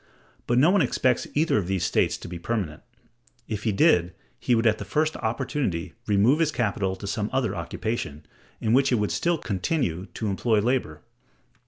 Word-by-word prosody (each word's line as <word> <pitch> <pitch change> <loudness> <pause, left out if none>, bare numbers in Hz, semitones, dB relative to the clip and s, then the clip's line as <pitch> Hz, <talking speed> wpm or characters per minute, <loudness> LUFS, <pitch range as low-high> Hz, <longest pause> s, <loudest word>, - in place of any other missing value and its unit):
But 120 - +2
no 155 +8 +5
one 200 -1 +4
expects 130 -2 +1
either 155 -6 +3
of 90 - -4
these 95 -2 -1
states - - +1
to - - -9
be 85 0 -7
permanent; 90 -6 -3 0.7
if 105 -1 -4
he 110 - +2
did, 90 -3 +3 0.2
he 125 - +2
would 115 +1 +1
at 110 -1 +3
the - - -4
first 155 +1 0
opportunity 115 - -2
remove 105 +8 +4
his 160 -2 +2
capital 100 -7 -1
to 95 - -9
some 105 +1 -2
other 130 -6 0
occupation, 105 -13 -4 0.3
in 110 - 0
which 135 +1 +4
it - - +4
would 105 -2 0
still 170 0 +1
continue 95 - -2
to 110 - -3
employ 110 +3 +1
labor. 110 - -1
110 Hz, 185 wpm, -25 LUFS, 95-130 Hz, 0.7 s, no